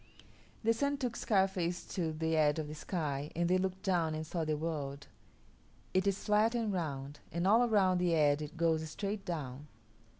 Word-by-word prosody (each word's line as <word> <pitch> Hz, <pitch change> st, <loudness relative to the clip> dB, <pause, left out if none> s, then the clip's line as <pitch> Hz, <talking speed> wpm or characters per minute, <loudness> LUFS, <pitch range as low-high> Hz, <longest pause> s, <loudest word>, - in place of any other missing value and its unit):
The 230 Hz, +1 st, +4 dB
Sun 280 Hz, +4 st, 0 dB
took 250 Hz, -4 st, -2 dB
Scarface 190 Hz, -5 st, +1 dB
to 165 Hz, -4 st, -1 dB
the 160 Hz, +1 st, -1 dB
edge 150 Hz, -1 st, +3 dB
of 155 Hz, -1 st, -2 dB
the 150 Hz, -, -6 dB
sky 150 Hz, -3 st, -3 dB
and 170 Hz, +1 st, +1 dB
they 185 Hz, +1 st, +3 dB
looked 190 Hz, +1 st, -2 dB
down 170 Hz, -5 st, +1 dB
and 155 Hz, 0 st, -4 dB
saw 165 Hz, +1 st, -2 dB
the 155 Hz, -1 st, 0 dB
world. 145 Hz, -3 st, -4 dB, 0.9 s
It 185 Hz, +1 st, +2 dB
is 195 Hz, 0 st, 0 dB
flat 215 Hz, +2 st, +3 dB
and 225 Hz, -4 st, 0 dB
round, 145 Hz, -5 st, -3 dB
and 170 Hz, +2 st, -1 dB
all 220 Hz, +5 st, +6 dB
around 190 Hz, -4 st, +3 dB
the 175 Hz, -2 st, +2 dB
edge 145 Hz, -1 st, +3 dB
it 150 Hz, +2 st, -7 dB
goes 160 Hz, -1 st, +1 dB
straight 200 Hz, +4 st, -4 dB
down. 145 Hz, -4 st, -5 dB
170 Hz, 190 wpm, -33 LUFS, 155-195 Hz, 0.9 s, all